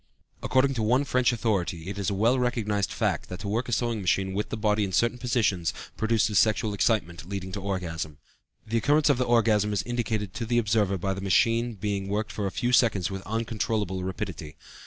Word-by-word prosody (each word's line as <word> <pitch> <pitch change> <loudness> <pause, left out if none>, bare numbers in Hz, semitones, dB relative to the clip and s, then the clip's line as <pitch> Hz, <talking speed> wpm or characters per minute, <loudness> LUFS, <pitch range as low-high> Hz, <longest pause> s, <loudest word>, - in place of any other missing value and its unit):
According 135 +1 +2
to 115 - -2
one 125 +6 +3
French 125 -3 +2
authority, 100 -7 -1
it 100 +1 -5
is 100 - 0
a 100 - -2
well 115 +6 +3
recognized 105 -5 0
fact 100 -5 -1
that 90 - -6
to 100 - -5
work 115 +5 -1
a - - -3
sewing 115 -1 0
machine 95 +1 +1
with 105 +2 -2
the - - -3
body 105 -1 +1
in 100 - -1
a - - -9
certain 120 +4 +2
position 115 -8 +1 0.3
produces 110 -2 +2
sexual 110 0 +2
excitement 95 -5 0
leading 95 -2 -4
to 100 - -4
the 95 - -9
orgasm. 80 -6 -3 0.5
The 115 +1 -1
occurrence 145 +4 +3
of 130 - 0
the 125 - +2
orgasm 110 -3 +3
is 100 -1 0
indicated 110 -5 -2
to 115 - -4
the 120 +1 +1
observer 105 -3 +2
by 95 +2 -1
the 95 - -6
machine 115 +4 +2
being 100 -1 -3
worked 105 +1 -2
for 105 -2 -2
a - - -3
few 120 +5 -1
seconds 105 -8 +3
with 95 0 -4
uncontrollable 110 -4 -2
rapidity. 90 -5 -5
105 Hz, 215 wpm, -27 LUFS, 95-115 Hz, 0.5 s, one